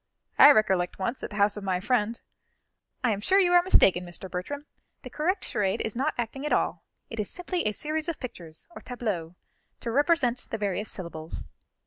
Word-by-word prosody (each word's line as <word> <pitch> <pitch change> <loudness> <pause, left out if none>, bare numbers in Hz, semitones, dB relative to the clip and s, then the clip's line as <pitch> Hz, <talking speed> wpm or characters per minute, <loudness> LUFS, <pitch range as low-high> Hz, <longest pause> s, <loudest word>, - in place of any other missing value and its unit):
I - - +11
recollect 190 -8 +3
once, 230 +7 -3
at - - -4
the 205 - -9
house 205 0 +2
of 210 - -6
my 185 -2 0
friend 230 +1 0 0.4
" - - -50
"I 245 - +3
am 205 -1 -2
sure 380 - +3
you 360 -3 +4
are 350 - +8
mistaken, 195 - +5
Mr. 180 +1 -7
Bertram; 285 +12 -4 0.4
the - - -9
correct 365 +6 0
charade 200 -4 0
is 220 - -2
not 275 +5 0
acting 240 +3 -3
at 300 - -2
all; - - +1 0.3
it 225 - -5
is 210 - -1
simply 360 -5 -2
a - - +2
series 310 +7 -3
of 330 - -4
pictures, 170 - -7
or - - -10
tableaux, 200 -9 -4 0.5
to 230 - -3
represent 270 -3 +2
the 225 - -2
various 205 0 -2
syllables." 160 - -6
225 Hz, 200 wpm, -27 LUFS, 190-290 Hz, 0.5 s, I